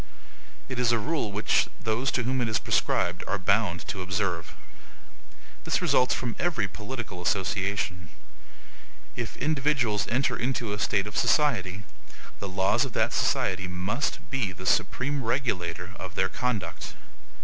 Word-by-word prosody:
It 130 -2 -4
is 120 -2 +4
a 120 - +4
rule 135 -2 -1
which 105 +2 +2
those 115 +5 0
to 125 - +1
whom 130 +2 0
it 120 - +1
is 110 - +2
prescribed 90 +1 +1
are 100 - +1
bound 95 -4 +1
to 95 - -3
observe. 90 -3 -2 1.1
This - - +1
results 125 - +3
from 120 -3 -3
every 160 - +1
political 105 0 -6
association. 95 -1 0 1.1
If 120 -2 -4
individuals 135 -8 +1
enter 130 +4 +1
into 120 -4 -1
a 105 - -4
state 100 -2 +2
of 105 - -7
society, 110 - +2 0.6
the 100 - -4
laws 95 +1 +2
of - - -4
that - - +1
society 95 0 +1
must 95 +10 -1
be 125 -8 0
the 90 +1 -9
supreme 140 +8 +1
regulator 90 -8 -1
of 95 -1 -7
their 95 0 +2
conduct. 105 -8 -3
105 Hz, 145 wpm, -28 LUFS, 95-125 Hz, 1.1 s, is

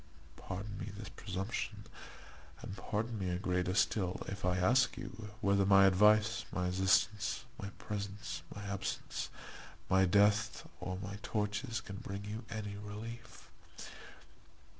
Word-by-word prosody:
Pardon 100 +2 -6
me - - -4
this 105 -2 -7
presumption, 100 +2 -4 0.8
and 95 - -5
pardon 110 +3 -2
me 95 -2 -1
a 90 - 0
greater 90 -1 0
still, 95 -4 +1
if 100 +1 -5
I 90 0 +2
ask 125 +8 +4
you, 110 -2 -7
whether 100 0 +4
my 95 0 +7
advice, 105 +4 +5
my 90 0 0
assistance, 95 +5 +2 0.2
my 100 - -4
presence, 100 -3 -4
my 105 - -6
absence, 100 -2 -3 0.6
my 95 0 +6
death, 105 +3 +3
or 90 0 -3
my 100 +2 -5
tortures 110 +3 -1
can 100 -2 -7
bring 100 -2 -5
you 110 +3 -5
any 105 -2 -4
relief? 110 +3 -8
100 Hz, 135 wpm, -35 LUFS, 95-110 Hz, 0.8 s, my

